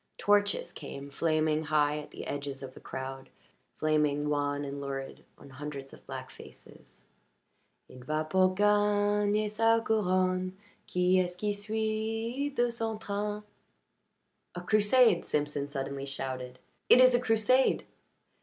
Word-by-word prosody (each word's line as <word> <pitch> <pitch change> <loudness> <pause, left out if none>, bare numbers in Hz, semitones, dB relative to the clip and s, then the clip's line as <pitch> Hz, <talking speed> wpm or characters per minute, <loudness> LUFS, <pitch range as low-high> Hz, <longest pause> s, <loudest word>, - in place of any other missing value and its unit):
Torches 205 0 +2
came, 140 -1 -8
flaming 155 +1 +1
high 150 0 +2
at 150 - -9
the - - -8
edges 140 -1 -5
of 130 -1 -8
the - - -12
crowd, 135 0 -7 0.5
flaming 150 -1 +1
wan 145 -1 -1
and 140 0 -5
lurid 135 -1 -6
on 140 - -14
hundreds 140 0 -7
of - - -16
black - - -7
faces. - - -15 0.8
"Il 130 - -13
va 155 +5 -2
pour 185 +2 +3
gagner 205 +1 +2
sa 225 +2 +3
couronne 185 -4 +1 0.3
Qui 180 +1 +3
est 180 - +2
ce 180 - -14
que 210 +2 -1
suit 220 +5 -2
dans 240 -2 +2
son 225 -1 -2
train?" 210 0 -3 1.1
"A 175 - -4
crusade!" 215 +1 +4
Simpson 145 -1 -2
suddenly 140 -1 -4
shouted. 130 -2 -5 0.3
"It - - +8
is 255 0 +7
a 245 - +4
crusade!" 235 +3 +2
180 Hz, 135 wpm, -30 LUFS, 145-210 Hz, 1.1 s, It